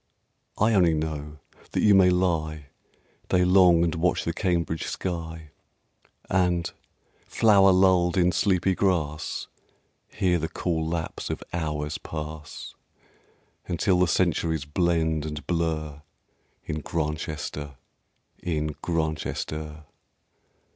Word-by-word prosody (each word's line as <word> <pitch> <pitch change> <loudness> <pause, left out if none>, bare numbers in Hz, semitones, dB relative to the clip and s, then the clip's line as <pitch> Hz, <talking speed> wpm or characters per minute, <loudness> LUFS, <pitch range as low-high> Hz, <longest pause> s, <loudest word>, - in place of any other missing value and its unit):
I 110 +2 +3
only 90 -5 +4
know 75 -1 -4 0.4
that - - +1
you 105 - +6
may 95 -2 +6
lie 80 -5 0 0.6
Day 90 0 +3
long 90 -2 +6
and 85 - +1
watch 90 +2 0
the 85 - -1
Cambridge 85 -4 -1
sky, 80 -3 -5 0.8
And, 90 -2 +1 0.6
flower 100 -3 +5
lulled 90 -1 +4
in 90 -1 +4
sleepy 95 -1 +2
grass, 85 -6 -1 0.6
Hear 90 -4 0
the 80 +1 -3
cool 80 -1 -2
lapse 80 -1 -4
of - - -4
hours 75 -3 -2
pass, 75 -1 -7 0.9
Until 90 +2 +1
the 90 - +4
centuries 80 -3 +1
blend 80 -1 +1
and 75 -1 -6
blur 80 -4 -2 0.6
In 75 - -3
Grantchester, 75 -2 -4 0.7
in 75 -3 -2
Grantchester.... 80 -1 -3
85 Hz, 105 wpm, -26 LUFS, 75-90 Hz, 0.9 s, you